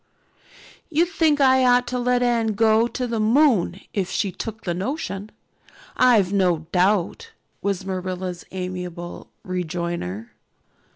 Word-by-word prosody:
"You'd 335 Hz, +1 st, +2 dB
think 315 Hz, -5 st, +2 dB
I 260 Hz, -1 st, +5 dB
ought 245 Hz, 0 st, +4 dB
to 250 Hz, 0 st, -2 dB
let 245 Hz, 0 st, +2 dB
Anne 230 Hz, -3 st, +1 dB
go 220 Hz, +2 st, +3 dB
to 250 Hz, +1 st, -3 dB
the 230 Hz, -2 st, -2 dB
moon 215 Hz, -, +3 dB
if 190 Hz, -3 st, -1 dB
she 195 Hz, -, -1 dB
took 220 Hz, +4 st, -7 dB
the 175 Hz, -, -1 dB
notion, 205 Hz, -, -4 dB, 0.7 s
I've 220 Hz, -7 st, +4 dB
no 180 Hz, -5 st, +2 dB
doubt," 200 Hz, -, +1 dB, 0.3 s
was 195 Hz, -2 st, -2 dB
Marilla's 185 Hz, -1 st, -4 dB
amiable 180 Hz, -2 st, -6 dB
rejoinder. 170 Hz, -, -4 dB
200 Hz, 125 wpm, -23 LUFS, 180-245 Hz, 0.7 s, I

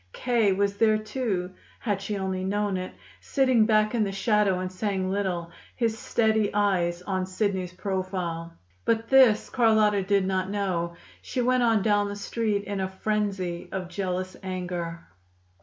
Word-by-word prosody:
K. 235 Hz, -5 st, +2 dB
was 200 Hz, +1 st, 0 dB
there, 215 Hz, -1 st, +4 dB
too, 215 Hz, -4 st, -2 dB, 0.3 s
had 205 Hz, -4 st, -2 dB
she 205 Hz, +1 st, -3 dB
only 190 Hz, -1 st, -2 dB
known 205 Hz, +1 st, 0 dB
it, 185 Hz, 0 st, -4 dB, 0.3 s
sitting 255 Hz, -5 st, +3 dB
back 215 Hz, 0 st, +3 dB
in 230 Hz, -3 st, +2 dB
the 200 Hz, -, -1 dB
shadow 200 Hz, -1 st, +2 dB
and 185 Hz, 0 st, -3 dB
saying 190 Hz, -1 st, -2 dB
little, 180 Hz, -4 st, -2 dB, 0.2 s
his 230 Hz, -3 st, 0 dB
steady 220 Hz, -2 st, +1 dB
eyes 180 Hz, -4 st, +1 dB
on 185 Hz, -1 st, -2 dB
Sidney's 190 Hz, -2 st, -1 dB
profile. 185 Hz, -3 st, -3 dB, 0.3 s
But 230 Hz, 0 st, 0 dB
this 255 Hz, -5 st, +6 dB
Carlotta 220 Hz, -4 st, +4 dB
did 195 Hz, 0 st, +2 dB
not 190 Hz, 0 st, -1 dB
know. 180 Hz, -4 st, -1 dB, 0.3 s
She 250 Hz, -, -4 dB
went 255 Hz, +1 st, +3 dB
on 225 Hz, -4 st, +3 dB
down 205 Hz, -1 st, +2 dB
the 200 Hz, -, -5 dB
Street 205 Hz, 0 st, -1 dB
in 200 Hz, 0 st, -4 dB
a 190 Hz, -, 0 dB
frenzy 190 Hz, -3 st, -2 dB
of 185 Hz, -2 st, -4 dB
jealous 185 Hz, 0 st, -3 dB
anger. 180 Hz, -3 st, -4 dB
200 Hz, 155 wpm, -26 LUFS, 185-215 Hz, 0.3 s, this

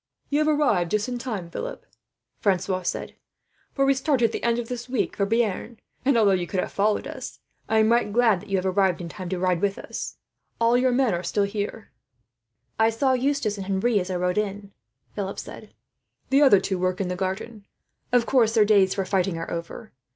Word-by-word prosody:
"You 290 Hz, -, +2 dB
have -, -, -1 dB
just 300 Hz, -1 st, +2 dB
arrived 210 Hz, -, +1 dB
in 245 Hz, -, -4 dB
time, 210 Hz, -9 st, -5 dB
Philip," -, -, -6 dB, 0.5 s
Francois 190 Hz, -1 st, 0 dB
said 180 Hz, -, -2 dB
presently, -, -, -26 dB, 0.5 s
"for 275 Hz, -, +2 dB
we 275 Hz, -, +4 dB
start 270 Hz, -1 st, 0 dB
at 225 Hz, -, +3 dB
the -, -, -4 dB
end 235 Hz, 0 st, +1 dB
of 240 Hz, -1 st, -3 dB
this 245 Hz, 0 st, -6 dB
week 250 Hz, -4 st, -1 dB
for 200 Hz, -, 0 dB
Bearn 225 Hz, +1 st, -1 dB, 0.2 s
and, 265 Hz, -1 st, +3 dB
although 210 Hz, -3 st, +5 dB
you 180 Hz, -2 st, 0 dB
could 190 Hz, -, -2 dB
have -, -, -2 dB
followed 210 Hz, +1 st, +1 dB
us, -, -, -7 dB, 0.3 s
I 220 Hz, -, +2 dB
am 220 Hz, +1 st, +4 dB
right 235 Hz, -3 st, +2 dB
glad 225 Hz, -4 st, +3 dB
that -, -, -14 dB
you 195 Hz, -, +1 dB
have 185 Hz, -, -2 dB
arrived 190 Hz, -1 st, +2 dB
in 170 Hz, -2 st, -6 dB
time 185 Hz, 0 st, -7 dB
to 185 Hz, -, -2 dB
ride 180 Hz, -1 st, +1 dB
with 200 Hz, -1 st, 0 dB
us. -, -, -6 dB, 0.4 s
All 230 Hz, +1 st, +3 dB
your 255 Hz, +1 st, +3 dB
men 250 Hz, -4 st, +2 dB
are 175 Hz, -, -1 dB
still 195 Hz, +3 st, 0 dB
here." 205 Hz, +2 st, -4 dB, 0.9 s
"I 220 Hz, 0 st, +5 dB
saw 260 Hz, +4 st, +1 dB
Eustace 255 Hz, -5 st, 0 dB
and 190 Hz, -, -6 dB
Henri, 200 Hz, +3 st, +1 dB
as 180 Hz, 0 st, -4 dB
I 185 Hz, -, -2 dB
rode 180 Hz, +2 st, 0 dB
in," 200 Hz, -1 st, -4 dB, 0.4 s
Philip 200 Hz, -1 st, -4 dB
said. -, -, -9 dB, 0.6 s
"The 275 Hz, +2 st, +5 dB
other 265 Hz, -9 st, +7 dB
two 190 Hz, -1 st, -2 dB
work 185 Hz, +1 st, 0 dB
in 195 Hz, -, -1 dB
the 180 Hz, -, -2 dB
garden. 195 Hz, +3 st, -4 dB, 0.4 s
Of 245 Hz, -1 st, +3 dB
course, 235 Hz, -4 st, +3 dB
their 215 Hz, -2 st, +5 dB
days 200 Hz, -3 st, +4 dB
for 195 Hz, -1 st, -1 dB
fighting 185 Hz, -2 st, 0 dB
are 165 Hz, -, -5 dB
over. 170 Hz, +6 st, -6 dB
210 Hz, 220 wpm, -25 LUFS, 190-240 Hz, 0.9 s, other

